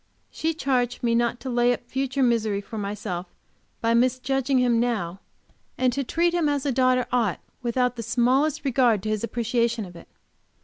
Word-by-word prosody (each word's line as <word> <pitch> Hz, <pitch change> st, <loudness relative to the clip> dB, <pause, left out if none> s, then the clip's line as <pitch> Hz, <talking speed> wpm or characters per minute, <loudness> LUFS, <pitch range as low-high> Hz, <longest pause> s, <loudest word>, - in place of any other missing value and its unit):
She 320 Hz, 0 st, -2 dB
charged 250 Hz, -5 st, -1 dB
me 235 Hz, -1 st, +2 dB
not 235 Hz, +1 st, +1 dB
to 265 Hz, -, -5 dB
lay 240 Hz, 0 st, +3 dB
up 245 Hz, -, -7 dB
future 265 Hz, +2 st, -1 dB
misery 220 Hz, -4 st, +1 dB
for 210 Hz, +2 st, -7 dB
myself 200 Hz, -3 st, -4 dB, 0.5 s
by 230 Hz, 0 st, +2 dB
misjudging 255 Hz, +2 st, +1 dB
him 245 Hz, -2 st, +3 dB
now, 210 Hz, -7 st, -1 dB, 0.6 s
and 255 Hz, -1 st, +2 dB
to 275 Hz, +2 st, -1 dB
treat 340 Hz, +6 st, +1 dB
him 335 Hz, -4 st, +2 dB
as 285 Hz, -1 st, -1 dB
a 280 Hz, -, +1 dB
daughter 255 Hz, 0 st, +2 dB
ought 235 Hz, -7 st, +1 dB, 0.2 s
without 250 Hz, 0 st, 0 dB
the -, -, -3 dB
smallest 260 Hz, +7 st, +1 dB
regard 240 Hz, -6 st, +2 dB
to 215 Hz, -, -2 dB
his 215 Hz, 0 st, -1 dB
appreciation 235 Hz, -1 st, 0 dB
of 175 Hz, -1 st, -12 dB
it. 170 Hz, -, -13 dB
245 Hz, 180 wpm, -25 LUFS, 230-260 Hz, 0.6 s, lay